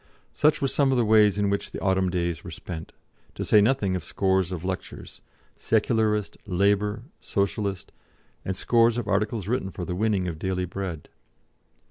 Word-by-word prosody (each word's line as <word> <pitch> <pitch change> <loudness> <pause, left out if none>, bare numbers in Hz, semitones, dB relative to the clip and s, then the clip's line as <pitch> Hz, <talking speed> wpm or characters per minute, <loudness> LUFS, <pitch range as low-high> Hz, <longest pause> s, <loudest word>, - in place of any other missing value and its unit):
Such 150 -1 +2
were - - +3
some 135 0 +2
of 130 - +2
the 120 - +3
ways 105 -2 +5
in 100 -1 +1
which 100 - -2
the - - -6
autumn 95 -1 +1
days 85 -2 -2
were - - -8
spent, 80 -3 -7 0.4
to - - -4
say 105 - +5
nothing 105 -4 +2
of 90 - -3
scores 95 -2 0
of 90 -2 -5
lectures 95 0 -6 0.3
Secularist, 110 -1 0
Labour, 105 +4 +1 0.2
Socialist 100 -1 -2 0.5
and 95 0 -3
scores 115 +1 +3
of 120 - -3
articles 105 0 0
written 110 -4 -1
for 90 -2 -6
the 90 - -3
winning 100 -1 0
of 80 -3 -5
daily 90 0 -1
bread. 90 -4 -5
100 Hz, 170 wpm, -25 LUFS, 95-110 Hz, 0.5 s, ways